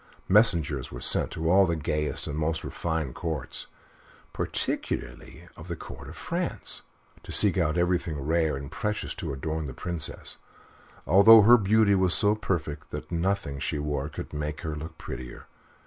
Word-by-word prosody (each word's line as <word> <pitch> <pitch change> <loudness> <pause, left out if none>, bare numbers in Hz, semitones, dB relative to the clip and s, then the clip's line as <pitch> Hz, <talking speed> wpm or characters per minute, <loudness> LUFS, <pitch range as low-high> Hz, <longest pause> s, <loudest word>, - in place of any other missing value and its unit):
Messengers 85 - +3
were - - -7
sent - - +3
to 80 0 -3
all 95 +3 +5
the 85 - 0
gayest 75 -1 -2
and 75 - -4
most 80 +1 -1
refined 80 -6 -3
Courts, 80 -2 -4 0.7
particularly 85 +2 -3
to - - -12
the 85 +2 -5
Court - - -10
of - - -10
France, - - -3 0.4
to - - -10
seek 100 -4 +4
out 85 -3 +1
everything 85 -3 0
rare 80 +1 +1
and 70 0 -8
precious 105 0 -3
to 80 -6 -5
adorn 80 +3 -3
the 65 - -7
Princess, 85 -3 -3 0.7
although 105 +4 +8
her 120 +4 +8
beauty 110 -1 +4
was 95 -2 +2
so 105 -1 +3
perfect 80 -8 -3
that - - -7
nothing 85 -4 -1
she 75 - -2
wore 75 -1 -2
could 75 - -8
make 75 0 -4
her 80 -1 -4
look 80 +1 -8
prettier. 60 0 -8
80 Hz, 165 wpm, -27 LUFS, 75-95 Hz, 0.7 s, although